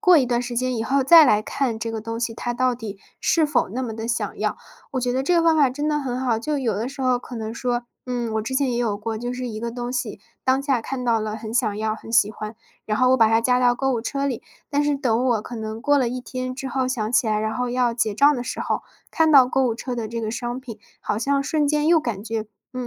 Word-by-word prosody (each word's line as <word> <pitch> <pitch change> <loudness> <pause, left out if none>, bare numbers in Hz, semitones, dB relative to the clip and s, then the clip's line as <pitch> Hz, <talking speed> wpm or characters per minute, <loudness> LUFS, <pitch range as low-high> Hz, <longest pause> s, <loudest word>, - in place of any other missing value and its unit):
过 360 -3 +6
一 260 - +2
段 240 0 0
时 245 0 -5
间 255 +1 0
以 225 - -2
后 275 +3 +2
再 320 +4 +9
来 215 -6 +4
看 235 +1 -2
这 230 0 -3
个 225 - -3
东 230 +1 -4
西， 235 -1 -2
它 240 +1 -3
到 255 +1 +1
底 220 -4 -7 0.2
是 320 -2 +3
否 270 -9 +1
那 250 +5 -3
么 230 -3 -4
地 225 0 -4
想 235 - -2
要。 - - -1 0.3
我 260 - -1
觉 245 0 0
得 260 - +1
这 350 +6 +2
个 335 - +4
方 330 -1 +4
法 280 -4 +4
真 290 +4 -2
的 300 -1 +1
很 255 -3 -3
好， 245 -4 +1
就 290 +5 -2
有 235 -6 0
的 215 +4 -2
时 270 - -9
候 255 -1 +2
可 250 - -10
能 220 -1 -4
说， 240 0 -1 0.2
嗯， 245 -3 -3
我 220 - 0
之 260 +5 -4
前 265 -1 +2
也 - - -1
有 225 -4 0
过， 220 +1 -3
就 245 +3 -4
是 250 0 -4
一 215 -2 -5
个 235 +1 -3
东 240 +1 -5
西， 250 - -3 0.2
当 260 +1 +2
下 270 -5 +1
看 260 +2 -4
到 230 -2 +3
了 215 0 -3
很 220 0 -7
想 215 -4 +1
要， 215 0 -1
很 225 +1 -10
喜 215 -2 +4
欢， 215 0 -7 0.3
然 215 -1 -1
后 255 - +4
我 260 - +5
把 225 -3 +5
它 225 +1 +3
加 250 +2 +3
到 245 -1 +4
购 270 +2 0
物 235 - -1
车 275 +3 -2
里， 255 -5 -3 0.3
但 290 0 +1
是 290 -1 +1
等 245 -3 +1
我 235 -4 +2
可 240 +1 -7
能 220 0 -5
过 290 +4 +3
了 260 -4 +2
一 255 +1 -4
天 255 0 -5
之 265 0 -5
后 260 +1 0
想 230 -4 -2
起 245 - +3
来， 215 -1 +1
然 220 0 -2
后 250 0 -1
要 245 -1 +1
结 220 -3 0
账 285 +7 +5
的 245 - -3
时 - - -5
候， - - -1 0.3
看 320 -1 +3
到 265 -3 +8
购 265 +1 +1
物 230 - 0
车 250 +2 -5
的 230 -2 -3
这 230 +1 -4
个 220 -1 -2
商 240 +2 -4
品， 230 -5 -9 0.2
好 210 - -2
像 275 +4 +1
瞬 295 0 +1
间 300 0 +1
又 335 0 +6
感 225 -8 -4
觉， 225 -1 -3 0.3
嗯， 255 -1 -3
245 Hz, 310 characters per minute, -23 LUFS, 225-265 Hz, 0.3 s, 再